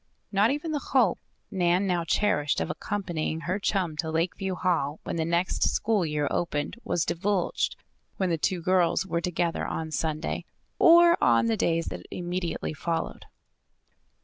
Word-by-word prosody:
Not 205 Hz, +2 st, +3 dB
even 295 Hz, +4 st, -2 dB
the 300 Hz, -, 0 dB
hope 250 Hz, -8 st, +2 dB, 0.3 s
Nan 180 Hz, 0 st, +2 dB
now 175 Hz, -3 st, +1 dB
cherished 165 Hz, -5 st, +1 dB
of 175 Hz, -, -1 dB
accompanying 170 Hz, -6 st, -3 dB
her 180 Hz, +4 st, -2 dB
chum 185 Hz, -6 st, 0 dB
to 160 Hz, +1 st, -2 dB
Lakeview 180 Hz, +4 st, -1 dB
Hall 160 Hz, -5 st, 0 dB
when -, -, -4 dB
the 165 Hz, -, 0 dB
next 170 Hz, +2 st, 0 dB
school 210 Hz, -6 st, +1 dB
year 150 Hz, -1 st, -1 dB
opened 150 Hz, +1 st, -2 dB
was 170 Hz, -, 0 dB
divulged 185 Hz, +1 st, 0 dB, 0.4 s
when 190 Hz, -2 st, 0 dB
the 165 Hz, -, +1 dB
two 180 Hz, 0 st, 0 dB
girls 185 Hz, 0 st, +2 dB
were 170 Hz, -3 st, -1 dB
together 175 Hz, -1 st, -1 dB
on 160 Hz, -1 st, -4 dB
Sunday, 155 Hz, 0 st, -2 dB, 0.3 s
or 340 Hz, 0 st, +7 dB
on 115 Hz, -1 st, +4 dB
the 115 Hz, -1 st, +2 dB
days 165 Hz, +6 st, +1 dB
that -, -, -8 dB
immediately 175 Hz, -2 st, -3 dB
followed. 165 Hz, +2 st, -3 dB
175 Hz, 155 wpm, -27 LUFS, 160-195 Hz, 0.4 s, or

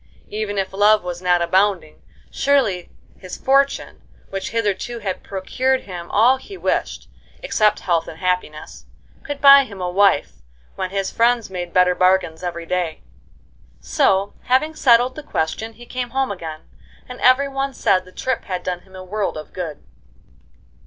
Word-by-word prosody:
Even 210 Hz, -1 st, -3 dB
if 190 Hz, -1 st, -2 dB
love 210 Hz, +1 st, +4 dB
was 175 Hz, 0 st, -5 dB
not 180 Hz, -1 st, +2 dB
abounding, 185 Hz, -2 st, +1 dB, 0.3 s
surely 255 Hz, -11 st, +1 dB, 0.3 s
his 185 Hz, -2 st, -8 dB
fortune, 275 Hz, +1 st, +1 dB, 0.3 s
which 195 Hz, 0 st, -4 dB
hitherto 230 Hz, +1 st, -2 dB
had 200 Hz, -4 st, -4 dB
procured 255 Hz, +7 st, -1 dB
him 175 Hz, -3 st, -8 dB
all 240 Hz, +6 st, +4 dB
he 390 Hz, +9 st, -11 dB
wished -, -, -2 dB, 0.4 s
(except 215 Hz, -, +2 dB
health 170 Hz, -3 st, 0 dB
and 160 Hz, -, -9 dB
happiness) 180 Hz, -4 st, -3 dB, 0.3 s
could 290 Hz, -1 st, -6 dB
buy 280 Hz, 0 st, +9 dB
him 205 Hz, -7 st, -10 dB
a 180 Hz, -1 st, -2 dB
wife, 185 Hz, -, +2 dB, 0.3 s
when 185 Hz, -1 st, -3 dB
his 195 Hz, 0 st, -2 dB
friends 235 Hz, -2 st, +1 dB
made 175 Hz, -2 st, -5 dB
better 180 Hz, 0 st, +4 dB
bargains 185 Hz, -3 st, +2 dB
every 170 Hz, -2 st, -5 dB
day. 175 Hz, -2 st, -2 dB, 0.8 s
So, 190 Hz, -, +1 dB
having 285 Hz, +5 st, +2 dB
settled 245 Hz, -3 st, +4 dB
the 310 Hz, -, -8 dB
question, 190 Hz, -, -3 dB
he 240 Hz, +2 st, -14 dB
came 250 Hz, 0 st, -4 dB
home 265 Hz, 0 st, -1 dB
again, 160 Hz, -5 st, -7 dB, 0.5 s
and 250 Hz, -, -10 dB
every 255 Hz, +2 st, +5 dB
one 275 Hz, 0 st, -2 dB
said 185 Hz, -7 st, +1 dB
the 185 Hz, -, -16 dB
trip 260 Hz, +5 st, -3 dB
had 185 Hz, -2 st, -4 dB
done 180 Hz, -1 st, -3 dB
him 190 Hz, +1 st, -19 dB
a 185 Hz, -, -8 dB
world 200 Hz, -1 st, -3 dB
of 155 Hz, -, -9 dB
good. 165 Hz, -6 st, -6 dB
195 Hz, 160 wpm, -20 LUFS, 180-245 Hz, 0.8 s, buy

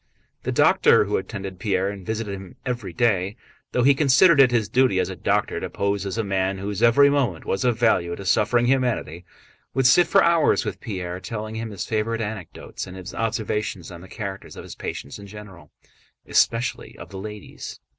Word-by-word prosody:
The -, -, -3 dB
doctor -, -, +4 dB
who -, -, -1 dB
attended 95 Hz, -2 st, -6 dB
Pierre 95 Hz, 0 st, 0 dB
and 100 Hz, -2 st, -9 dB
visited 110 Hz, 0 st, -3 dB
him 95 Hz, -1 st, -9 dB
every 120 Hz, -7 st, -3 dB
day, 100 Hz, -1 st, +1 dB, 0.4 s
though 125 Hz, -, +1 dB
he 140 Hz, +2 st, +6 dB
considered 140 Hz, +3 st, +5 dB
it 130 Hz, -, +6 dB
his 120 Hz, -4 st, +1 dB
duty 125 Hz, -7 st, +2 dB
as 90 Hz, 0 st, 0 dB
a -, -, -6 dB
doctor -, -, 0 dB
to -, -, -5 dB
pose 100 Hz, 0 st, -1 dB
as 95 Hz, -, -4 dB
a 115 Hz, -, 0 dB
man 95 Hz, -1 st, -1 dB
whose 100 Hz, +1 st, -4 dB
every 120 Hz, +5 st, +6 dB
moment 130 Hz, -, 0 dB
was 95 Hz, -, -1 dB
of 120 Hz, -3 st, +1 dB
value 85 Hz, -7 st, +2 dB
to 100 Hz, -, -9 dB
suffering 110 Hz, +5 st, +2 dB
humanity, 120 Hz, -, 0 dB, 0.5 s
would 135 Hz, -1 st, +1 dB
sit 170 Hz, +7 st, +6 dB
for -, -, +4 dB
hours 170 Hz, -2 st, +3 dB
with -, -, -5 dB
Pierre 95 Hz, -6 st, -5 dB
telling 110 Hz, +1 st, -6 dB
him 110 Hz, 0 st, -4 dB
his 100 Hz, -, -5 dB
favorite 115 Hz, +1 st, -1 dB
anecdotes 105 Hz, -4 st, -6 dB
and 90 Hz, 0 st, -9 dB
his 95 Hz, 0 st, -8 dB
observations 105 Hz, -4 st, -3 dB
on 85 Hz, -1 st, -10 dB
the 95 Hz, -, -12 dB
characters 100 Hz, -3 st, -7 dB
of -, -, -9 dB
his -, -, -9 dB
patients 70 Hz, -, -6 dB
in 100 Hz, -, -10 dB
general, 95 Hz, -7 st, -12 dB, 0.6 s
and -, -, -16 dB
especially 115 Hz, +2 st, +1 dB
of -, -, -10 dB
the 95 Hz, -, -8 dB
ladies. 105 Hz, 0 st, -8 dB
105 Hz, 200 wpm, -23 LUFS, 95-120 Hz, 0.6 s, he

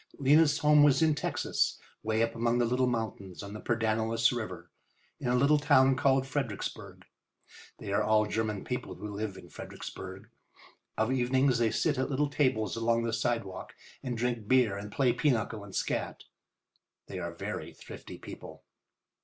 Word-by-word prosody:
Lena's 145 Hz, +2 st, +5 dB
home 150 Hz, -1 st, +5 dB
was 145 Hz, +2 st, +5 dB
in 160 Hz, -1 st, +4 dB
Texas, 150 Hz, -, -1 dB, 0.3 s
away 110 Hz, +1 st, +1 dB
up 115 Hz, 0 st, -1 dB
among 115 Hz, +1 st, +1 dB
the 120 Hz, -, +3 dB
little 125 Hz, +2 st, +1 dB
mountains 110 Hz, -6 st, -4 dB
on 100 Hz, 0 st, -8 dB
the 105 Hz, -, -7 dB
Pedernales 115 Hz, 0 st, +1 dB
River, 120 Hz, -3 st, -5 dB, 0.5 s
in -, -, -4 dB
a 125 Hz, -, +2 dB
little 140 Hz, +4 st, +4 dB
town 135 Hz, -2 st, +5 dB
called 135 Hz, 0 st, +2 dB
Fredericksburg. 135 Hz, -7 st, -4 dB, 0.7 s
They 100 Hz, -, -5 dB
are -, -, +3 dB
all 110 Hz, 0 st, +3 dB
German 105 Hz, -1 st, -2 dB
people 125 Hz, 0 st, -4 dB
who 105 Hz, -1 st, -7 dB
live 105 Hz, -2 st, -4 dB
in -, -, -12 dB
Fredericksburg. -, -, -8 dB, 0.7 s
Of 110 Hz, +3 st, +1 dB
evenings 130 Hz, 0 st, +2 dB
they 115 Hz, -1 st, +3 dB
sit 125 Hz, -, 0 dB
at 130 Hz, -, 0 dB
little 145 Hz, +1 st, 0 dB
tables 120 Hz, -9 st, +1 dB
along 115 Hz, 0 st, +1 dB
the 115 Hz, -1 st, -2 dB
sidewalk 115 Hz, -5 st, -2 dB, 0.3 s
and 125 Hz, -3 st, -4 dB
drink 120 Hz, -2 st, -2 dB
beer 125 Hz, -5 st, +4 dB
and 100 Hz, +1 st, -7 dB
play 130 Hz, -1 st, +2 dB
pinochle 115 Hz, -6 st, 0 dB
and 100 Hz, -2 st, -10 dB
scat. -, -, -2 dB, 0.8 s
They -, -, -6 dB
are -, -, -4 dB
very -, -, -5 dB
thrifty -, -, -11 dB
people. -, -, -10 dB
120 Hz, 165 wpm, -30 LUFS, 110-130 Hz, 0.8 s, Lena's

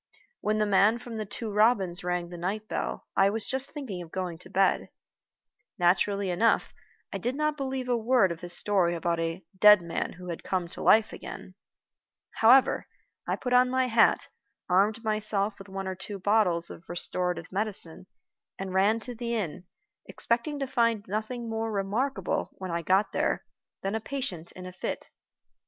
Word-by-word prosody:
When 215 Hz, +1 st, 0 dB
the 215 Hz, -, +2 dB
man 205 Hz, +3 st, +4 dB
from 240 Hz, -2 st, -8 dB
The 215 Hz, -2 st, -4 dB
Two 220 Hz, +2 st, -4 dB
Robins 200 Hz, -4 st, +3 dB
rang 180 Hz, -1 st, -2 dB
the 175 Hz, -, -8 dB
night 205 Hz, +5 st, -3 dB
bell, -, -, -3 dB
I 195 Hz, 0 st, +5 dB
was 220 Hz, +1 st, -2 dB
just 265 Hz, +1 st, -1 dB
thinking 250 Hz, -, -6 dB
of 170 Hz, -, -9 dB
going 180 Hz, -3 st, -4 dB
to -, -, -13 dB
bed. 195 Hz, 0 st, +2 dB, 0.9 s
Naturally 190 Hz, +2 st, +2 dB
enough, 225 Hz, +6 st, +2 dB, 0.4 s
I -, -, -3 dB
did 245 Hz, +2 st, -2 dB
not 305 Hz, +1 st, 0 dB
believe 265 Hz, -2 st, -3 dB
a 245 Hz, -, +2 dB
word 230 Hz, -4 st, +3 dB
of 170 Hz, 0 st, -6 dB
his 175 Hz, 0 st, -3 dB
story 185 Hz, -4 st, +2 dB
about 170 Hz, 0 st, -1 dB
"a 165 Hz, +2 st, -3 dB
dead 210 Hz, -1 st, +7 dB
man 170 Hz, -1 st, -3 dB
who 180 Hz, 0 st, -10 dB
had 170 Hz, -, -5 dB
come 185 Hz, -2 st, -1 dB
to -, -, -8 dB
life 220 Hz, 0 st, +5 dB
again." -, -, -9 dB, 0.8 s
However, 250 Hz, +4 st, +5 dB, 0.4 s
I -, -, +1 dB
put 250 Hz, -1 st, -3 dB
on 250 Hz, 0 st, +5 dB
my 260 Hz, 0 st, +2 dB
hat, 230 Hz, -2 st, +3 dB, 0.4 s
armed 205 Hz, +5 st, +2 dB
myself 215 Hz, -2 st, 0 dB
with 195 Hz, -, -11 dB
one 195 Hz, 0 st, -5 dB
or 190 Hz, -, -2 dB
two 195 Hz, +2 st, -7 dB
bottles 190 Hz, -4 st, +2 dB
of 165 Hz, -, -12 dB
restorative 175 Hz, 0 st, -2 dB
medicine, 190 Hz, -3 st, -2 dB, 0.5 s
and 190 Hz, -1 st, -5 dB
ran 200 Hz, +4 st, +3 dB
to 245 Hz, -, -6 dB
the 235 Hz, 0 st, -3 dB
inn, 180 Hz, -4 st, -4 dB, 0.4 s
expecting 240 Hz, +6 st, -1 dB
to 275 Hz, -, -2 dB
find 230 Hz, -5 st, +1 dB
nothing 220 Hz, +4 st, -3 dB
more 225 Hz, 0 st, -2 dB
remarkable, 205 Hz, +1 st, -1 dB
when 185 Hz, -2 st, -6 dB
I 170 Hz, 0 st, -1 dB
got 190 Hz, +5 st, +2 dB
there, -, -, 0 dB, 0.4 s
than 195 Hz, +1 st, -1 dB
a 220 Hz, -, 0 dB
patient 220 Hz, -11 st, -4 dB
in 185 Hz, -, -9 dB
a 185 Hz, -, -8 dB
fit. 185 Hz, -, -5 dB
205 Hz, 180 wpm, -28 LUFS, 180-230 Hz, 0.9 s, dead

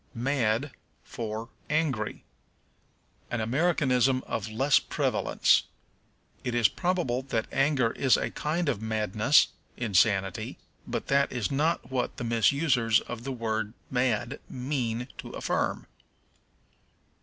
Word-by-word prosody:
Mad 125 Hz, +1 st, 0 dB, 0.3 s
for 110 Hz, 0 st, -5 dB, 0.2 s
Angry. 145 Hz, -9 st, -1 dB, 1.1 s
An 120 Hz, -, -2 dB
Americanism 130 Hz, 0 st, +2 dB
of 110 Hz, 0 st, -3 dB
lessening 135 Hz, +6 st, +2 dB
prevalence. -, -, +2 dB, 0.8 s
It 125 Hz, -, -2 dB
is 120 Hz, -3 st, +5 dB
probable 175 Hz, -9 st, -1 dB
that 115 Hz, -4 st, -2 dB
anger 135 Hz, -4 st, +2 dB
is 130 Hz, -5 st, +3 dB
a -, -, -2 dB
kind 165 Hz, +3 st, -1 dB
of 120 Hz, -7 st, 0 dB
madness 110 Hz, +4 st, +3 dB, 0.3 s
(insanity), 100 Hz, -3 st, +1 dB, 0.3 s
but -, -, -3 dB
that 140 Hz, 0 st, +3 dB
is 120 Hz, +1 st, -2 dB
not 145 Hz, -2 st, 0 dB
what 130 Hz, -2 st, -2 dB
the -, -, -4 dB
misusers 115 Hz, 0 st, +3 dB
of 120 Hz, -1 st, -7 dB
the 135 Hz, -, -2 dB
word 110 Hz, -3 st, -2 dB, 0.2 s
mad 125 Hz, -2 st, 0 dB
mean 125 Hz, -3 st, -2 dB
to -, -, -7 dB
affirm. -, -, -1 dB
125 Hz, 115 wpm, -28 LUFS, 110-140 Hz, 1.1 s, is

